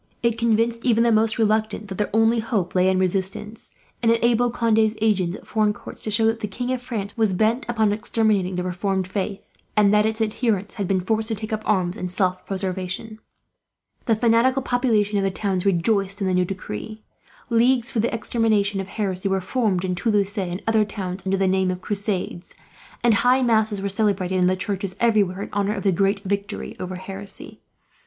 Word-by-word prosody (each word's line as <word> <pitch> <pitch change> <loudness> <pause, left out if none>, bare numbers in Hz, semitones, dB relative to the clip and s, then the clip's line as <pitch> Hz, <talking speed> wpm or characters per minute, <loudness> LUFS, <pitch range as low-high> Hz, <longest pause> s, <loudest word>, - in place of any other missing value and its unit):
It 235 -1 +2
convinced 230 0 +1
even 230 -2 +3
the 235 - +3
most 220 0 +3
reluctant 215 -1 0
that 190 0 -7
their 210 - 0
only 225 +2 +3
hope 220 -6 -1
lay 185 0 +3
in 190 - +2
resistance; 190 +3 -2 0.3
and 230 -1 +4
enabled 235 +1 +2
Conde's 220 -1 +2
agents, 195 -5 +1
at - - -12
foreign 215 -1 +1
courts, - - -11
to - - -1
show 215 +2 +3
that 225 0 +1
the 210 - -3
King 245 +5 -4
of 255 -1 -2
France 215 -5 -5
was 220 -4 +2
bent 220 +6 +1
upon 220 -3 +2
exterminating 210 -3 0
the 180 - -2
reformed 185 +1 -1
faith, 195 +1 -4 0.3
and 205 -1 +5
that 210 +1 +4
its 220 0 -2
adherents 215 -2 -1
had 200 -4 -3
been 185 -1 +1
forced 220 +3 0
to 225 - 0
take 215 +2 -6
up 215 - -2
arms, 185 -2 +1
in 180 - -3
self 185 0 -1
preservation. 190 +3 -3 0.9
The 225 - +3
fanatical 235 +4 +3
populations 220 -6 +1
of - - 0
the 195 - +2
towns 190 -1 -1
rejoiced 195 +2 +1
in 195 - -1
the 185 - +1
new 180 0 +2
decree. 195 - -7 0.5
Leagues 240 +2 +3
for 230 - -1
the 230 - +1
extermination 215 -3 0
of 190 - -7
heresy 195 -2 -2
were 190 0 +1
formed, 190 -3 0
in 180 - -1
Toulouse 205 +1 0
and 185 -2 -3
other 225 -1 +3
towns, 195 -3 -5
under 195 +1 +1
the 190 0 +1
name 190 0 +2
of 180 0 -4
Crusades; 200 -3 -3 0.5
and 240 -2 +5
high 250 +5 +3
masses 220 -4 +1
were - - 0
celebrated 195 -2 0
in 180 - +4
the 185 - +2
churches, 190 0 -3
everywhere, 205 -5 +2
in - - -9
honour 205 +1 0
of - - -5
the 195 - +3
great 195 +2 +1
victory 200 0 -3
over 185 0 -5
heresy. 195 +2 -5
205 Hz, 200 wpm, -23 LUFS, 190-225 Hz, 0.9 s, and